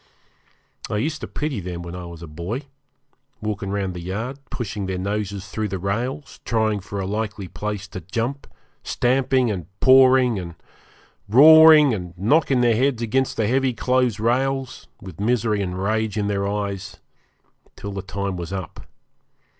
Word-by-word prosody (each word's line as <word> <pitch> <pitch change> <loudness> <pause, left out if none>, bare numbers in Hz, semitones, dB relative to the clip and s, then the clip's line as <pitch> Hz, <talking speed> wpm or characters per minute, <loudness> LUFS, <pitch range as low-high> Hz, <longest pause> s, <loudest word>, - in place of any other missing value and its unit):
I 105 - -1
used 150 +7 -2
to - - -5
pity 150 -6 -3
them 90 -2 -6
when 85 0 -7
I 90 -1 -7
was 85 -1 -10
a - - -8
boy, 85 - -5 0.8
walking 105 -3 -3
round 100 -2 -2
the 90 - -6
yard, 110 +10 -4
pushing 105 -5 -4
their 95 -1 -2
noses 100 0 -3
through 110 -1 -2
the 95 -1 -3
rails, 120 +10 -3
trying 110 -3 0
for 100 +1 -6
a 95 - -2
likely 105 -1 -3
place 105 +2 -5
to 95 - -7
jump, 115 - -3 0.3
stamping 130 -1 +1
and 90 -5 -5
pawing 130 -3 +5
and 85 -2 -7 0.7
roaring 155 +2 +8
and 90 -4 -6
knocking 130 - +2
their 120 -2 +3
heads 125 0 +1
against 130 +3 0
the 110 - +1
heavy 130 +3 +1
close 125 -2 +1
rails, 130 +3 -1
with 95 -3 -11
misery 110 -1 +1
and 90 -1 -3
rage 110 0 0
in 105 - 0
their 100 -1 -1
eyes, 100 -2 -4 0.8
till 100 - -7
their 100 -1 -4
time 100 0 -4
was 85 0 -6
up. 95 -2 -7
105 Hz, 160 wpm, -22 LUFS, 95-125 Hz, 0.8 s, roaring